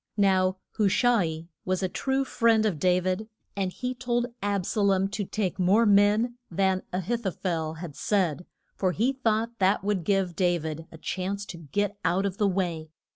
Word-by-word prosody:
Now 190 -2 +3 0.2
Hu 210 -3 +3
sha 245 +4 +3
i 160 -2 -2 0.2
was 185 +1 -1
a - - +2
true 270 +8 -1
friend 230 -3 +3
of 185 -8 0
Da 180 +2 +3
vid, 185 +4 -2 0.3
and 190 -2 -1
he 250 +5 -3
told 240 -1 -1
Ab 200 -2 0
sa 215 - -1
lom 195 -1 +3
to 205 +1 -3
take 190 -2 -2
more 195 +6 +4
men 210 +4 +3
than 190 +1 +1
A 180 - -1
hith 235 +6 -2
o - - +3
phel 165 -4 -3
had 165 -6 -7
said, 180 -5 0 0.3
for 185 -2 0
he 240 +8 +1
thought 230 -2 -1
that 190 0 +3
would 200 -3 0
give 190 -2 +1
Da 175 -1 +2
vid 160 0 -6
a 160 - -11
chance 195 +4 -3
to 180 - -8
get 205 +7 -2
out 180 +4 +1
of 195 -1 -3
the 205 - +3
way. 175 -5 -1
195 Hz, 200 wpm, -27 LUFS, 180-215 Hz, 0.3 s, more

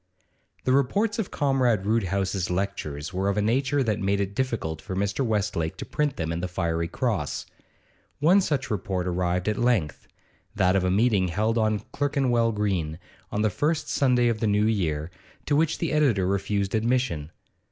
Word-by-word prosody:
The 130 - +1
reports 200 - +2
of 210 - -2
Comrade 130 -8 +1
Roodhouse's 95 -3 0
lectures 90 -5 -3
were 95 +2 0
of 100 - -1
a - - +3
nature 135 +5 +1
that 110 -3 0
made 100 0 +1
it 100 0 -2
difficult 100 -11 -2
for 95 +3 -6
Mr. 100 +6 0
Westlake 105 -8 -1
to - - -6
print 150 -2 -1
them 80 0 -3
in 85 - -2
the 90 - -2
'Fiery 85 -2 -1
Cross;' - - -2 0.7
one 175 +7 +5
such 135 -8 -1
report 95 -3 -2
arrived 90 +1 -1
at 105 -1 0
length, 115 - 0 0.5
that 90 +1 +3
of 95 - +2
a 90 - +1
meeting 100 -1 +3
held 105 +6 0
on 110 -2 +1
Clerkenwell 130 -5 +1
Green 95 -7 -1 0.3
on 105 - 0
the 110 - +2
first 155 +6 -1
Sunday 125 -3 +3
of 115 -2 0
the 110 - 0
new 105 +1 +3
year, 85 -7 0 0.3
to 145 - +1
which 160 +1 +2
the 170 - -2
editor 135 -11 +2
refused 100 +1 -1
admission. 115 - 0
105 Hz, 175 wpm, -26 LUFS, 90-125 Hz, 0.7 s, one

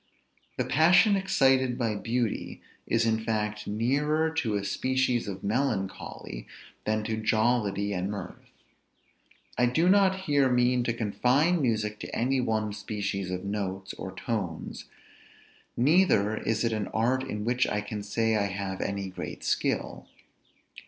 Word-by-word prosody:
The - - 0
passion 180 +7 +5
excited 135 -10 +2
by 115 -4 0
beauty 115 +2 -2 0.3
is 115 0 +2
in 110 -1 +2
fact 105 -1 -2
nearer 145 +9 +1
to 120 -10 0
a 100 -1 -2
species 130 +3 0
of 95 -2 -6
melancholy, 100 - -3 0.4
than 110 0 0
to 110 0 -2
jollity 110 -2 +1
and 90 0 -2
mirth. 100 -3 -7 1.1
I 125 - +5
do 160 +8 +2
not 190 0 +4
here 145 -7 +2
mean 125 0 +3
to 115 - +1
confine 125 - +2
music 110 -4 0
to - - -6
any 130 +2 +1
one 110 -3 -1
species 100 -2 -3
of 90 +1 -4
notes, 95 -2 -3
or 95 - -7
tones, 95 -9 -4 0.9
neither 125 - +4
is 110 +1 -1
it 115 -1 +1
an 105 -3 -2
art 125 +4 +1
in 105 -5 -4
which 125 +2 +2
I 105 - -1
can 105 0 -5
say 110 +2 0
I 100 -1 +1
have 95 -1 -4
any 100 -1 -2
great 95 - -7
skill. - - -1
110 Hz, 145 wpm, -28 LUFS, 105-130 Hz, 1.1 s, passion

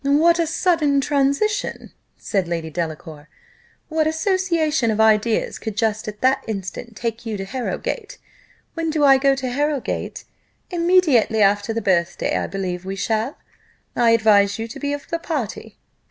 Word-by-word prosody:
"What 315 +5 +4
a 335 - +1
sudden 315 -4 +2
transition!" 280 +9 0 0.3
said 195 -5 -1
Lady 165 -2 -3
Delacour. 155 -2 -6 0.6
"What 315 -1 +1
association 320 - +1
of 220 0 -1
ideas 220 0 +2
could 215 -2 -6
just 220 -1 0
at 210 0 -7
that 260 +1 +2
instant 220 +2 -6
take 230 +1 -4
you 220 -3 -4
to 195 - -5
Harrowgate? 420 - -4 0.6
When 330 -1 -2
do 310 -1 0
I 270 -1 +6
go 275 0 +3
to 265 -1 -4
Harrowgate? 290 0 -2 0.5
Immediately 335 - +3
after 205 +2 +2
the 225 -1 -3
birthday, 175 -3 +1
I - - -1
believe 180 -2 -4
we 190 +1 -5
shall 220 +6 -1 0.6
I 240 -1 +3
advise 210 -3 +4
you 225 0 -4
to - - -8
be 285 0 -2
of 290 0 -5
the 335 -1 -2
party." 285 - -5
240 Hz, 155 wpm, -21 LUFS, 205-305 Hz, 0.6 s, I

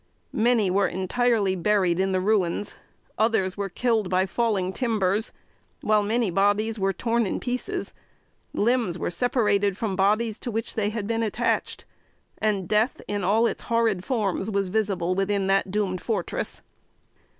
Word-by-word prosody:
Many 225 -4 +2
were 195 +1 +3
entirely 200 +1 +1
buried 185 -1 +1
in 190 0 +1
the 185 - +1
ruins, 200 -1 0 0.4
others 215 -4 +2
were 200 -1 -3
killed 220 -1 0
by 185 +1 +2
falling 195 -3 0
timbers, 215 -3 +1 0.5
while 215 -1 +3
many 220 0 0
bodies 205 +4 +1
were 195 0 +2
torn 230 +3 0
in - - -2
pieces. 250 0 -3 0.6
Limbs 230 -5 +1
were - - -2
separated 205 -2 +1
from 215 -5 -2
bodies 210 +3 +1
to 245 - -5
which 225 0 -3
they 210 -2 0
had 215 -1 -4
been 225 +2 -1
attached, 220 -2 -1 0.5
and 205 -4 0
death, 215 +4 +1
in 205 -1 -2
all 215 +5 +3
its - - -1
horrid 230 -5 +1
forms, 205 -4 -1
was 200 -2 -1
visible 190 -4 0
within 195 +1 0
that 195 0 +2
doomed 190 -2 -1
fortress. 225 -3 -3
205 Hz, 150 wpm, -25 LUFS, 190-225 Hz, 0.6 s, were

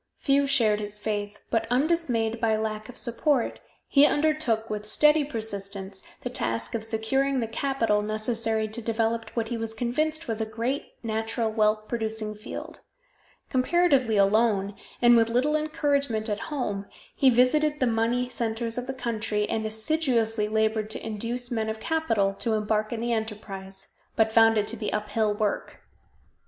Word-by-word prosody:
Few 280 0 +2
shared 225 -6 +3
his 210 0 -5
faith, 205 -1 -3
but 225 -1 +1
undismayed 245 -5 +1
by 225 -2 +3
lack 215 0 -3
of 250 - -10
support, 250 +2 0 0.3
he 280 - +5
undertook, 295 -8 +1
with 210 -1 -4
steady 300 +5 +5
persistence, 200 -6 -5 0.2
the 250 - -4
task 115 - -2
of 225 - -2
securing 255 +5 0
the 235 - 0
capital 230 -4 0
necessary 220 +1 -1
to 220 +2 -3
develop 225 0 -1
what 225 -2 -1
he 235 - -2
was 225 0 -4
convinced 305 +7 -1
was 225 -1 -2
a - - 0
great 235 +6 -3
natural 225 0 -1
wealth 215 0 +1
producing 220 -2 -3
field. 210 +1 -8 0.7
Comparatively 265 -4 +3
alone, 200 0 +3 0.3
and 240 0 +8
with 230 -1 +4
little 260 +6 +2
encouragement 280 -7 0
at 210 0 -1
home, 205 -9 -3 0.3
he 270 - +5
visited 295 +5 +3
the 255 - +3
money 235 +2 +1
centers 230 -1 -2
of 250 - -6
the 265 - -4
country, 215 -4 -1
and 220 -1 -1
assiduously 225 -2 0
labored 220 0 0
to 220 - -6
induce 235 +3 -4
men 220 -2 -1
of 220 0 -4
capital 225 -11 +1
to 230 - 0
embark 215 0 0
in 230 -1 -3
the 235 0 0
enterprise, 195 -3 -5 0.3
but 220 0 +3
found 225 0 +5
it 210 -1 +1
to - - -1
be 215 - -3
uphill 210 +1 0
work. 210 -1 -2
225 Hz, 160 wpm, -26 LUFS, 215-250 Hz, 0.7 s, and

